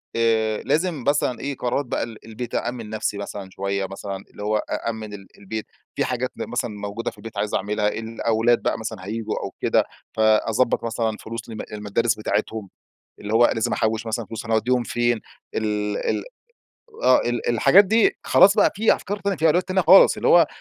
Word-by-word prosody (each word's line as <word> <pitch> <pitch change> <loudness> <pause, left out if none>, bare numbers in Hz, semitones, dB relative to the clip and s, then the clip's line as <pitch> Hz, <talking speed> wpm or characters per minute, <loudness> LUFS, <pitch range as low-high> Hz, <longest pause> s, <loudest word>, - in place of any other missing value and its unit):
آآ 110 -2 +1
لازم 155 0 0
مثلًا 145 -3 +1
إيه، 140 -2 -4
قرارات 125 +3 -1
بقى - - -2
ال 115 -2 -9
البيت. 115 +2 -6
أأمن 120 -2 -3
نفسي 110 -1 -2
مثلًا 100 -1 -6
شويّة 100 0 -2
مثلًا، 95 0 -6
اللي 105 - -9
هو 105 +1 +1
أأمن 110 -1 -4
ال 100 -1 -10
البيت، 110 +2 -5 0.3
في - - +1
حاجات 125 0 -2
مثلًا 120 -1 -3
موجودة 105 +3 -4
في - - -21
البيت 110 0 -10
عايز 105 +1 -2
أعملها، 105 +1 0
الأولاد 115 +1 0
بقى - - -1
مثلًا 95 -4 -6
هييجوا 110 +1 -3
أو - - -4
كده، - - +3 0.3
فأضبط 110 +2 +2
مثلًا 115 -1 -1
فلوس 115 +1 -7
لمد 110 - -6
المدارس 105 +2 0
بتاعتهم. 105 -1 -2 0.5
اللي 105 +1 -5
هو 120 +2 +6
لازم 110 - 0
أحوِّش 110 +1 0
مثلًا 110 +1 -2
فلوس، 110 +1 -7
هنوديهم 115 +3 +1
فين؟ 120 -1 0 0.3
ال 105 -1 -1
ال - - -1 0.8
آه 130 - +6
ال 120 -1 -1
الحاجات 175 - +6
دي 230 - +3
خلاص - - +6
بقى، - - +4
في 220 +2 +4
أفكار 205 +1 -5
تانية، 200 -3 -1
في 160 - 0
أولويات 175 +4 +2
تانية، 190 0 +2
خالص. 185 +3 +7
اللي - - -1
هو 175 - +8
آآ، - - +4
115 Hz, 185 wpm, -23 LUFS, 105-120 Hz, 0.8 s, هو